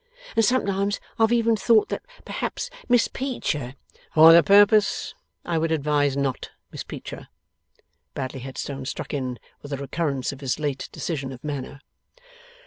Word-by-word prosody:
And 225 - +4
sometimes 200 -4 +1 0.2
I - - +5
have 225 - -2
even 230 -1 +3
thought 215 +1 +3
that - - -3 0.2
perhaps - - -4 0.2
Miss 245 -2 +4
Peecher 150 - -3 0.2
' - - -30
'For 160 +1 +9
the 170 - +9
purpose, 205 +4 +4 0.3
I 170 -2 0
would 165 0 0
advise 145 -2 +1
Not 135 -3 -2 0.2
Miss - - -6
Peecher,' - - -8 0.9
Bradley 130 -1 -4
Headstone 135 +1 -6
struck 135 - -5
in 130 -3 -3 0.2
with 145 - -10
a 140 - -2
recurrence 140 -1 -2
of 140 0 -11
his 135 -3 -1
late 145 -3 -3
decision 135 -6 -4
of 130 -1 -10
manner. 140 -1 -5
150 Hz, 155 wpm, -24 LUFS, 135-200 Hz, 0.9 s, For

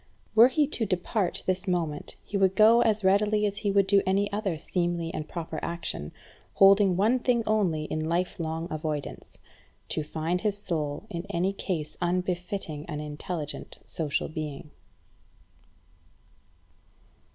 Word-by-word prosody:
Were 225 +2 +8
he 295 +3 +2
to 275 -5 -1
depart 185 +1 0
this 185 +1 -1
moment 165 -5 -1
he - - -7
would 190 -1 +3
go 225 +3 +7
as 215 -2 +2
readily 210 +2 +3
as 205 -1 -1
he 205 - -1
would 200 -1 +4
do 200 0 +4
any 200 +2 +1
other 200 -5 -1
seemly 170 0 -2
and 155 -5 -4
proper 160 -2 -5
action, 170 - -4 0.4
holding 195 -1 +6
one 225 +6 +3
thing 240 -2 +1
only 190 -8 +1
in 155 +1 -3
life 180 +2 -1
long 165 0 -3
avoidance 155 -2 -5 0.5
to - - -1
find 160 +4 -2
his 210 -2 0
soul 155 -3 -3
in 170 +2 -5
any 190 +1 0
case 165 -6 -4
unbefitting 180 -3 -2
an 150 -3 -4
intelligent 150 +1 -5
social 150 -4 -2
being. 150 -1 -6
180 Hz, 140 wpm, -27 LUFS, 160-200 Hz, 0.5 s, Were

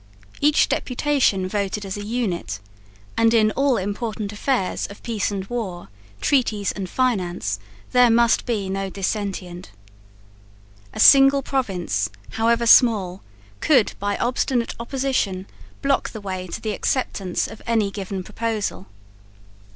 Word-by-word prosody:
Each 295 +1 +4
deputation 250 -8 +1
voted 200 +1 -2
as 190 - -4
a 205 - -5
unit; 205 - -2 0.6
and 230 0 +3
in 215 -1 +4
all 275 -1 +2
important 210 +1 -3
affairs 210 -3 -1
of 200 - -13
peace 225 -4 -1
and 195 -2 -4
war, 195 - -5 0.3
treaties 220 -7 +1
and 190 -3 -6
finance, 175 - -1 0.3
there 250 -1 +6
must 235 +1 +3
be 215 -5 -1
no 195 0 -2
dissentient. 190 -2 -4 1.2
A - - -9
single 275 0 +7
province, 180 - -1 0.2
however 230 +1 +1
small, 210 -6 +5 0.4
could, 260 -8 +3
by 205 0 -1
obstinate 245 -1 0
opposition, 235 -7 -1 0.4
block 275 0 +1
the 220 - -8
way 185 -2 -5
to - - -5
the 215 - -3
acceptance 195 -7 -1
of 220 - -11
any 220 -4 +1
given 195 -2 -5
proposal. 215 -2 -3
210 Hz, 130 wpm, -22 LUFS, 190-240 Hz, 1.2 s, single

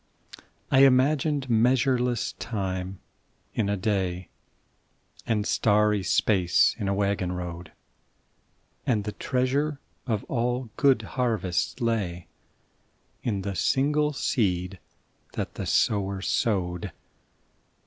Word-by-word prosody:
I 135 - +5
imagined 135 +2 +4
measureless 125 0 +2
time 95 -4 -4 0.5
in 105 -3 0
a 100 - 0
day, 95 -3 -1 1.0
And 105 -3 0
starry 105 -1 +2
space 95 -2 +3
in 100 - -2
a 100 - +1
waggon 100 -2 0
road, 90 -1 -6 1.2
And 110 -4 +2
the 105 - -3
treasure 135 +6 -1 0.3
of 110 -4 -1
all 125 -1 -2
good 135 -5 +3
harvests 110 -4 -1
lay 100 -7 -1 1.0
In 100 -5 -2
the 100 0 -3
single 150 +8 +1
seed 95 -9 -1 0.5
that - - -4
the - - -5
sower 100 -2 +1
sowed. 95 -2 -1
105 Hz, 100 wpm, -26 LUFS, 95-125 Hz, 1.2 s, I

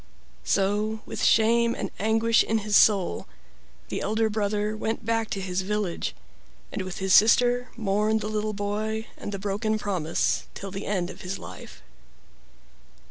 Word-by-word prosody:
So, 210 +3 0
with - - -5
shame 235 +1 +4
and - - -4
anguish 225 +2 +3
in 225 - 0
his 210 -1 +1
soul, 195 - +4 0.6
the - - -3
elder 220 +1 +1
brother 210 0 -1
went 220 +1 -3
back 225 -1 0
to 195 - -3
his 185 -1 -2
village, 200 -2 -2 0.6
and - - -3
with 185 0 -6
his 190 -2 +1
sister 245 +3 +5
mourned 215 0 +1
the 210 - -3
little 215 0 -2
boy 215 +2 -2
and - - -6
the 200 - -3
broken 205 +2 -1
promise 185 -7 -1
till 195 -1 -6
the 195 +2 -6
end 185 -3 -1
of - - -12
his 185 +1 -4
life. 85 -7 -11
210 Hz, 155 wpm, -26 LUFS, 195-220 Hz, 0.6 s, sister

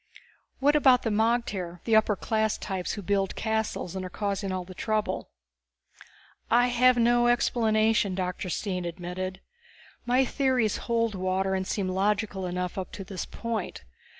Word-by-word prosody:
"What 290 +2 +3
about 260 -4 +5
the 225 - 0
magter, 210 -6 0
the 225 - +2
upper 215 -1 +4
class 220 +2 0
types 190 -2 -3
who 205 - -6
build 195 0 0
castles 220 -5 -2
and 190 - -3
are 185 - -5
causing 200 0 -2
all 185 -1 -2
this 185 0 -12
trouble?" 215 -1 -1 1.2
"I 245 +2 +4
have 250 +1 +4
no 240 0 +4
explanation," 220 -4 +2
Dr. 180 0 -3
Stine 180 0 -2
admitted. 180 +2 -5 0.7
"My 255 +2 +4
theories 255 -5 +1
hold 230 -1 +1
water 190 0 0
and 190 0 -1
seem 195 -3 -1
logical 195 0 0
enough 180 +1 -3
up 185 - -5
to 195 - -6
this 190 -1 -6
point. 230 - -4
205 Hz, 150 wpm, -27 LUFS, 185-230 Hz, 1.2 s, about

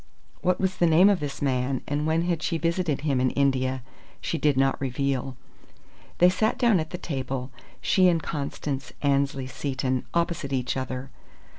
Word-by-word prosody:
What 180 0 +1
was 190 -1 0
the 175 - +4
name 175 +5 +6
of 195 - +1
this 145 -1 -4
man, 130 -1 0
and 145 +2 -1
when 160 +1 +2 0.2
she 160 - -1
had 165 - -3
visited 165 -4 0
him 140 -4 +1
in 130 - +3
India, 130 -2 +1 0.4
she 165 - -2
did 145 -3 +2
not 135 0 +2
reveal. 135 -1 -1 0.8
They 180 - +6
sat 215 +7 +1
down 235 -7 +4
at 155 0 -3
the 180 - -5
table, 130 -5 -4 0.3
she 185 -2 +4
and 165 -3 +2
Constance 140 -3 -4
Annesley 140 -1 +1
Seton, 130 -1 -2
opposite 170 -5 0
each 125 -2 -1
other. 130 0 -4
140 Hz, 170 wpm, -26 LUFS, 130-170 Hz, 0.8 s, name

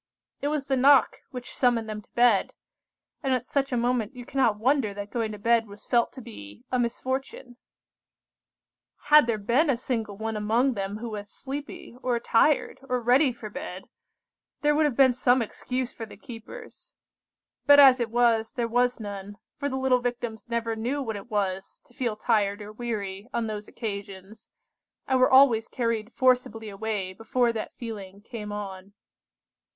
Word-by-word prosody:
It 285 - -1
was 295 -2 -1
the 270 - +2
knock 270 +1 +5
which 250 -1 -8
summoned 240 -3 +1
them 215 -1 -5
to - - -30
bed; 240 -4 +3 0.7
and 265 -2 +1
at 250 - -3
such 275 0 -1
a 250 - 0
moment 240 0 0
you 245 -1 -9
cannot 240 -6 +1
wonder 240 -2 +1
that 205 0 -6
going 225 -2 -1
to 210 - -7
bed 230 +2 +2
was 205 0 -13
felt 235 -2 +2
to 260 - -9
be 105 - -11
a 255 - +1
misfortune. 250 +1 -3 1.5
"Had 300 -5 +8
there 230 -2 +1
been 240 +10 +2
a 260 - +2
single 225 -5 -3
one 220 +1 -3
among 225 +5 +1
them 200 -1 -4
who 235 +2 -6
was 205 -1 -6
sleepy, 280 -1 -7
or 245 -2 0
tired, 270 +6 +2
or 250 0 +1
ready 255 +4 +4
for 220 -3 -9
bed, 185 -1 -7 0.7
there 295 0 +3
would 305 +1 +3
have 285 -5 0
been 260 -1 +5
some 250 +1 +3
excuse 250 +2 -3
for 225 - -7
the - - -13
keepers; 255 - -11 0.7
but 285 0 +9
as 265 -2 +8
it 235 -1 -1
was, 230 -1 +2
there 235 -1 -1
was 245 +1 +1
none, 205 -1 -7 0.2
for 285 -1 -1
the 265 - -3
little 260 -1 +3
Victims 240 -2 -4
never 230 -1 -1
knew 245 +6 -2
what 225 -3 -4
it 200 +3 -9
was 195 -3 -2
to - - -21
feel 235 -3 -2
tired 210 -2 +1
or 210 0 -8
weary 210 -3 -5
on 235 -1 0
those 210 -1 -5
occasions, 200 0 -7 0.6
and 260 -1 +2
were 255 - +5
always 260 -4 +6
carried 230 -2 -2
forcibly 250 -4 +1
away 200 -2 -3
before 235 +4 0
that 220 - -5
feeling 200 -5 -7
came 210 -1 -8
on. 195 -1 -7
235 Hz, 175 wpm, -26 LUFS, 210-255 Hz, 1.5 s, but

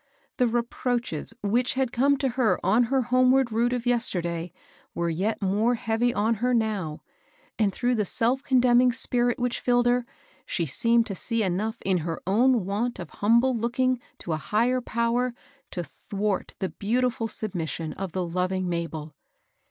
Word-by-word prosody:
The 250 - +3
reproaches 240 - -2
which 240 +6 +1
had 260 -2 0
come 275 +3 +3
to 270 -1 0
her 245 -2 +1
on 215 +6 +4
her 260 +2 +1
homeward 255 +1 +3
route 235 +2 +1
of 245 -1 -2
yesterday 175 -9 0 0.4
were 170 0 0
yet 200 +6 -1
more 210 +6 +2
heavy 225 +1 0
on 225 0 +1
her 250 0 +2
now, 205 -9 -2 0.6
and 210 -3 +3
through 245 +5 0
the 220 -3 +1
self 240 +7 +1
condemning 250 -2 +4
spirit 245 -1 +1
which 245 -1 -1
filled 245 -1 +2
her, 245 0 +2 0.4
she 170 - -2
seemed 230 - +2
to 200 - -4
see 230 +4 -1
enough 205 +5 -1
in 190 -2 +2
her 165 0 -4
own 230 +2 +3
want 220 +5 -2
of - - -8
humble 235 +5 +3
looking 245 +2 0 0.2
to 170 - -6
a 155 - 0
Higher 235 - +1
Power 235 +1 0 0.3
to 175 - -4
thwart 200 +4 -3
the 190 - -2
beautiful 235 +2 -1
submission 165 -7 -3
of 195 -2 -5
the 185 +1 -2
loving 185 +2 -1
Mabel. 165 -3 -4
230 Hz, 165 wpm, -26 LUFS, 190-245 Hz, 0.6 s, on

